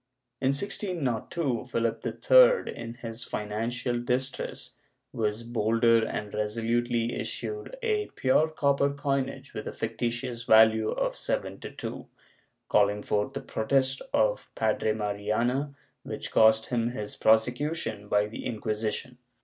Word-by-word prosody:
In 130 - +2
1602, 140 - -1
Philip 115 -2 -1
III, - - +5
in 115 0 -7
his 115 0 -6
financial 120 +4 -2
distress, 130 +2 -3 0.4
was 110 +1 -1
bolder 115 0 +3
and 105 -1 -4
resolutely 115 +2 0
issued 425 +4 -5
a 430 -2 +1
pure 135 +4 +3
copper 140 -2 +1
coinage 140 -1 -2
with 110 - -5
a - - -3
fictitious 120 +1 -3
value 110 -1 +6
of - - -1
seven - - -3
to - - -7
two, - - -7 0.6
calling 105 0 +3
forth 105 0 0
the - - -4
protest 130 +3 0
of 105 -1 +1
Padre 110 0 +1
Mariana 110 +7 -1 0.3
which - - -6
cost 110 0 +5
him 120 -2 +1
his 105 -4 -5
prosecution 110 0 +1
by 105 0 +3
the 105 - -7
Inquisition. 110 +3 -3
115 Hz, 125 wpm, -28 LUFS, 110-135 Hz, 0.6 s, value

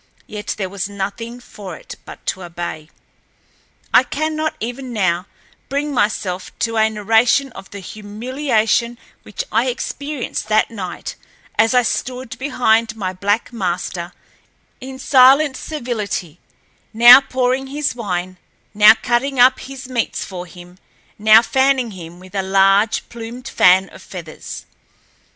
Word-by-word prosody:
Yet 210 -1 -5
there 195 -3 -2
was 195 +1 -4
nothing 205 +5 -5
for 200 -7 -10
it - - -11
but - - -12
to 190 - -2
obey. 170 -3 -6 1.0
I - - +8
cannot, 310 +1 -2
even 245 +3 -5
now, 185 -4 0 0.4
bring 285 +2 -2
myself 205 -5 -1
to 230 -1 -1
a 220 0 +4
narration 225 +5 +2
of 195 - -11
the 200 - -9
humiliation 230 +3 -1 0.2
which 210 - -6
I 230 +4 +2
experienced 270 0 -4
that 215 +1 +2
night 185 -5 -6 0.4
as 225 +4 +3
I 250 - +5
stood 250 +1 -3
behind 230 -5 +1
my 190 -4 -3
black 205 +6 -1
master 180 -3 -3 0.7
in 265 0 -8
silent 270 +2 +5
servility, 215 - -4 0.5
now 240 +4 +9
pouring 260 0 -1
his 290 +2 -2
wine, 185 -6 -4 0.4
now 210 +1 +8
cutting 255 +2 0
up 255 +1 +6
his 270 -1 -9
meats 245 -3 -2
for 180 -2 -7
him, 180 +1 -14 0.4
now 215 +2 +7
fanning 265 -3 +1
him 175 -2 -10
with 185 +1 -15
a 195 - 0
large, 195 +2 +3
plumed 235 +2 -8
fan 185 +2 +4
of - - -14
feathers. 170 -5 -9
225 Hz, 135 wpm, -19 LUFS, 195-255 Hz, 1.0 s, now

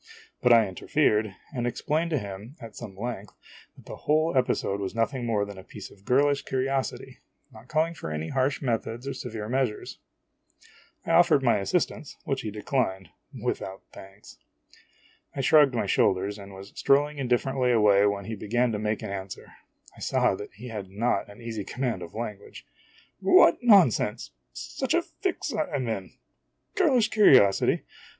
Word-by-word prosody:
but 125 - +4
I 115 -3 +6
interfered, 105 0 0 0.2
and 120 -3 -2
ex 120 - -4
plained 160 +3 0
to 155 - 0
him, 100 +3 -7
at 115 -3 -11
some 100 -5 -9
length, 105 -2 -5 0.4
that - - -16
the - - -8
whole 155 +1 +2
episode 125 -6 0
was 100 +2 -4
nothing 120 +2 -1
more 105 -3 +1
than 100 -2 -9
a - - -11
piece - - -10
of 100 0 -20
girlish 140 +2 +3
curiosity, 135 0 -3 0.3
not 110 +2 -15
calling 160 +3 0
for 155 - -7
any 75 +1 -4
harsh 135 +2 0
methods 120 0 -2
or 140 - -2
severe 110 -4 -6
measures. 125 -3 -2 1.1
I - - -2
offered 135 - +5
my 120 -4 +3
assistance, 150 - -2
which 135 -1 -1
he 110 - -4
declined, 105 - -2 0.3
without 95 0 -4
thanks. 95 +1 -14 1.0
I 140 - -1
shrugged 140 -1 +5
my 115 - 0
shoulders 95 +1 +1
and 100 0 -11
was 95 +1 -11
strolling 145 +2 +2
indif 125 -3 +1
ferently 130 -2 0
away 105 -3 +5
when 100 -1 -2
he 110 - -5
began 120 +4 0
to 105 - -2
make 105 0 -2
an - - -5
answer. 95 -1 -7 0.4
I - - -16
saw - - +1
that 105 +2 -8
he 120 +5 -9
had 105 -4 -6
not 105 +2 -1
an 100 +3 -13
easy 110 -3 -4
command 125 +3 -3
of 85 - -9
lan 110 -3 -4
guage. - - -14 0.5
"What 170 - +5
nonsense! 175 - +4 0.2
such - - -3
a - - +2
fix - - -4
I - - -1
'm 130 -4 -2
in! 100 -5 -4 0.6
Girlish 285 - +3
curiosity? 130 - +5
115 Hz, 170 wpm, -26 LUFS, 100-135 Hz, 1.1 s, I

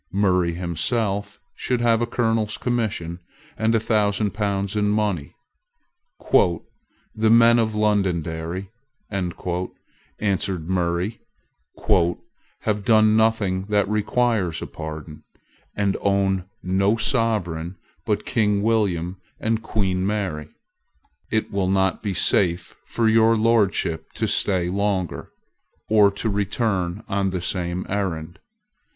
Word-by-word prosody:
Murray 90 -3 +2
himself 100 +4 -1
should 125 -1 -1
have 115 -1 +3
a 120 - 0
colonel's 115 -3 0
commission, 110 -8 -2 0.4
and 110 +1 +1
a - - +4
thousand 105 -1 +1
pounds 100 -1 -1
in 105 -1 +1
money. 105 -8 -1 1.8
"The 110 0 +1
men 115 +1 +6
of 110 -2 0
Londonderry," 95 -3 -1 0.4
answered 90 0 -4
Murray, 90 +3 -1 1.4
"have 105 -1 -1
done 110 0 +5
nothing 110 -4 +2
that 105 -1 +1
requires 105 -3 0
a - - -4
pardon, 75 0 -8 0.5
and 100 -1 +1
own 95 -2 +1 0.2
no 95 +4 +2
Sovereign 95 -8 0 0.3
but - - -1
King 105 -3 +1
William 95 -6 0 0.2
and 115 0 0
Queen 95 -5 -1
Mary. 95 -7 -2 0.8
It 110 0 0
will 100 -2 0
not 95 -1 +1
be 100 -3 -3
safe 85 -2 +1
for 115 -1 0
your 115 +1 +4
Lordship 100 -8 +1
to - - -1
stay 90 -3 +1
longer, 95 -2 -1 0.6
or 105 -2 +5
to 100 +3 -4
return 100 -2 -1
on 100 -1 0
the 90 -1 -2
same 90 -1 -2
errand. 90 -3 -3
100 Hz, 110 wpm, -23 LUFS, 90-110 Hz, 1.8 s, men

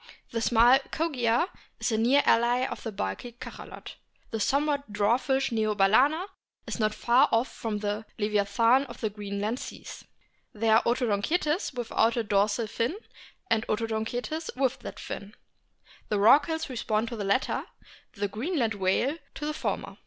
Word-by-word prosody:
The 230 - -2
small 240 +3 +5
Kogia 260 -3 +1 0.3
is - - 0
a 220 - +1
near 260 +5 +4
ally 240 +2 +3
of - - -5
the 225 - -5
bulky 195 - -4
Cachalot. 240 - -10 0.3
The 225 - -2
somewhat 285 +1 0
dwarfish 245 +6 +1
Neo 215 -2 0
balcena 255 - +4 0.4
is - - -5
not 215 -1 +1
far 240 +2 +4
off 230 +3 +1
from 220 -2 -3
the 205 +1 -3
leviathan 215 +5 +2
of - - -10
the 220 -2 -2
Green 200 -1 -5
land 220 +5 -1
seas. - - -9 0.5
There 220 +1 +3
are 230 - +2
Odontocetes 260 - 0
without 235 -1 +1
a 235 - +1
dorsal 205 +2 +1
fin, 230 - -2 0.5
and 220 -8 +2
Odontocetes 230 +8 -2
with 265 0 0
that - - -8
fin. 200 +1 -7 0.7
The 210 - +1
Rorquals 285 +10 +4
correspond 225 -4 -1
to 235 - -5
the 210 - -4
latter, 200 +6 0 0.5
the 205 0 -2
Greenland 230 - -1
whale 205 - 0 0.2
to 295 - -5
the 305 - -1
former. - - -4
230 Hz, 155 wpm, -28 LUFS, 210-265 Hz, 0.7 s, small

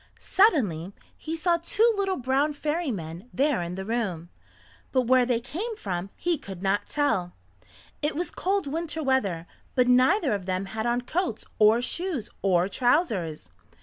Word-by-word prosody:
Suddenly 205 - +2 0.2
he 320 +1 -5
saw 340 +1 +2
two 435 +7 +2
little 390 -2 0
brown 270 +4 +1
fairy 305 +2 -2
men 175 +1 -6
there 280 -5 +1
in 175 +1 -4
the 190 0 -5
room, 195 -7 -2 0.6
but 255 -1 +3
where 250 0 +4
they 240 -2 +2
came 340 - -5
from 185 - -4
he 345 -4 -1
could 190 -1 -9
not 195 +1 0
tell. 225 -12 0 0.7
It 295 +1 -1
was 345 +3 -2
cold 390 0 0
winter 320 +2 -3
weather, 200 - +1 0.3
but 250 -1 +4
neither 255 - +4
of 195 -2 -4
them 185 +1 -1
had 220 +4 -3
on 240 +1 +1
coats 320 - -2
or 220 +3 +5
shoes 340 - -3
or 180 -2 +3
trousers. 200 - 0
250 Hz, 160 wpm, -26 LUFS, 195-320 Hz, 0.7 s, or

